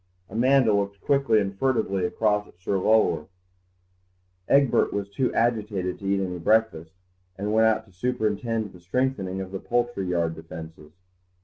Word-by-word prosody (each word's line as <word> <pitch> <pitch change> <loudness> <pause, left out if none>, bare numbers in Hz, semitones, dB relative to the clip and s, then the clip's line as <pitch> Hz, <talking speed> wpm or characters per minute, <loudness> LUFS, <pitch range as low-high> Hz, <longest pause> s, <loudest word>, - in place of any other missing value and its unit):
Amanda 125 +1 +3
looked 100 0 -1
quickly 135 -5 +2
and 100 -1 -2
furtively 100 -6 0
across 105 +1 0
at - - -21
Sir 95 +1 -1
Lulworth. 95 -7 +2 1.2
Egbert 140 -2 +3
was 100 -1 -3
too 125 +6 0
agitated 105 -6 0
to 100 - -6
eat 100 0 +2
any 90 -2 -3
breakfast, 95 -3 +1 0.4
and 105 +2 -2
went 110 0 +5
out 110 0 +1
to 100 - -22
superintend 110 0 -2
the 90 - -14
strengthening 95 -1 -2
of 95 -1 -7
the 95 - -4
poultry 120 -4 -1
yard 85 -2 0
defences. 80 -1 -10
100 Hz, 150 wpm, -25 LUFS, 95-115 Hz, 1.2 s, went